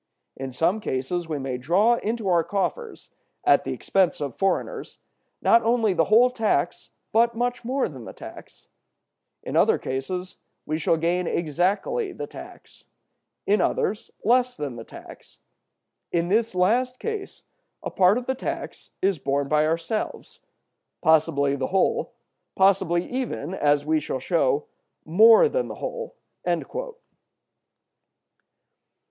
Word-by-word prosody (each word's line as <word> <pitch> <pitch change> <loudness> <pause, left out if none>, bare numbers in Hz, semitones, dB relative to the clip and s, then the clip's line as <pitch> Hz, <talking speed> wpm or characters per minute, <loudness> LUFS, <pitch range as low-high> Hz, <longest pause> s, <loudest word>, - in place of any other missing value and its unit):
In 135 0 -6
some 165 +11 +1
cases 165 +4 -3
we 155 - -2
may 135 -2 -4
draw 200 - +3
into 225 -2 -3
our 175 -3 +3
coffers, 205 - -3 0.3
at - - +4
the - - -3
expense 190 -3 +1
of 140 -4 -4
foreigners, 195 - -2 0.5
not 230 - +5
only 225 -3 +2
the 165 -2 +2
whole 235 +4 +5
tax, 225 -4 -1 0.2
but 235 +1 +3 0.3
more 260 +3 0
than 130 -7 -10
the - - -8
tax; - - -12 0.8
in - - -5
other - - +4
cases 180 +8 -4 0.3
we 155 +1 -2
should 165 +1 +1
gain 175 +1 0
exactly 185 - -1
the - - -5
tax; - - -13 0.6
in 205 -1 +3
others, 205 +3 -1
less 250 +3 +2
than 140 -4 -4
the 115 - -8
tax. - - -14 0.7
In 170 0 0
this 220 0 +1
last 245 +8 +2
case 430 - -6 0.4
a - - -4
part 190 +3 +4
of 250 - -4
the 260 - 0
tax 260 - -6
is 190 -4 +2
borne 140 +1 -1
by 150 +1 +2
ourselves; 165 +7 -3 0.6
possibly 140 -3 +3
the 130 -2 -2
whole, 190 0 0 0.4
possibly 185 -3 +3
even, 245 - -4
as 145 -4 +2
we 155 0 +2
shall 135 - -4
show, 145 0 +1 0.4
more 220 - +7
than - - -1
the - - -7
whole." - - -6
185 Hz, 135 wpm, -24 LUFS, 155-230 Hz, 0.8 s, more